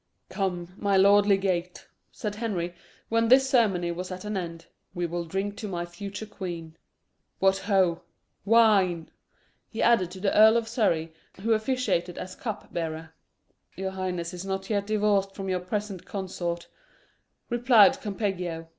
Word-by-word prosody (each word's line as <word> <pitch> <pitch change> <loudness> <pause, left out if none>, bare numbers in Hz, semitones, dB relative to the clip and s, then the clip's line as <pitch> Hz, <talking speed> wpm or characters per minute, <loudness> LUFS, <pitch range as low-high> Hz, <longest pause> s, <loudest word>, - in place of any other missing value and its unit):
"Come, 180 -3 -3
my 200 -1 +2
lord 200 +1 +6
legate," 185 -3 0 0.3
said 210 -1 -4
Henry, 200 -6 -3 0.4
when 230 0 +2
this 265 +3 +6
ceremony 200 -10 +2
was 180 +2 -5
at 185 +2 -7
an 210 0 -3
end, 170 -3 -5 0.3
"we 175 0 -1
will 170 0 -3
drink 195 +4 -3
to 210 - -5
my 175 -3 -3
future 200 +5 -7
queen. 170 -6 -7 0.6
What 195 0 +3
ho! 190 -5 +2 0.4
wine!" 195 -7 +4 0.6
he 225 - -8
added 210 -7 +4
to 185 +1 -10
the 195 +1 0
Earl 220 +2 +7
of 230 -1 -1
Surrey, 170 -9 0 0.3
who 225 +2 +2
officiated 215 -7 0
as 185 0 -6
cup 220 -5 -6
bearer. 160 -1 -4 0.6
"Your 190 0 -3
highness 180 -2 -3
is 180 0 -6
not 195 +1 -4
yet 200 -1 0
divorced 205 -2 +1
from 195 -1 -5
your 185 -1 0
present 195 +1 -4
consort," 175 -3 -4 0.8
replied 240 +2 +5
Campeggio. 180 -6 -3
195 Hz, 150 wpm, -27 LUFS, 175-210 Hz, 0.8 s, Earl